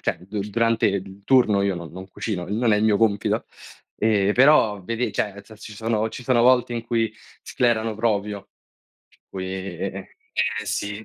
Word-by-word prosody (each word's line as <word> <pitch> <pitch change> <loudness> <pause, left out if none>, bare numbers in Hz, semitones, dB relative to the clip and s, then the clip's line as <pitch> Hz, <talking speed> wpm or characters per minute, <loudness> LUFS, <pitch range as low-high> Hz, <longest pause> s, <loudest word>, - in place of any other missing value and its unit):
cioè - - -1
durante 110 +3 0
il 100 0 -3
turno 120 -6 +4
io 100 -2 +1
non 85 -2 -8
non 95 +2 -9
cucino, 95 -3 -4
non 110 +3 +1
è - - +4
il 110 - +1
mio 105 -2 +4
compito. 105 -2 +1 0.5
Ehm, 105 -2 +2
però 120 -6 +4
vedi, 115 +5 -2
cioè 100 -2 -1
nel 100 - -12
senso 110 0 -15
ci 110 - -9
sono 110 0 -1
ci 125 - -9
sono 125 -2 +2
volte 125 -1 +4
in 120 -1 -3
cui 115 -2 0 0.3
sclerano 115 -2 0
proprio. 105 -2 -2 0.6
Per - - -29
cui 95 -1 -5
eh, 95 -2 -5 0.6
sì. 105 +1 -3
105 Hz, 175 wpm, -23 LUFS, 100-115 Hz, 0.6 s, turno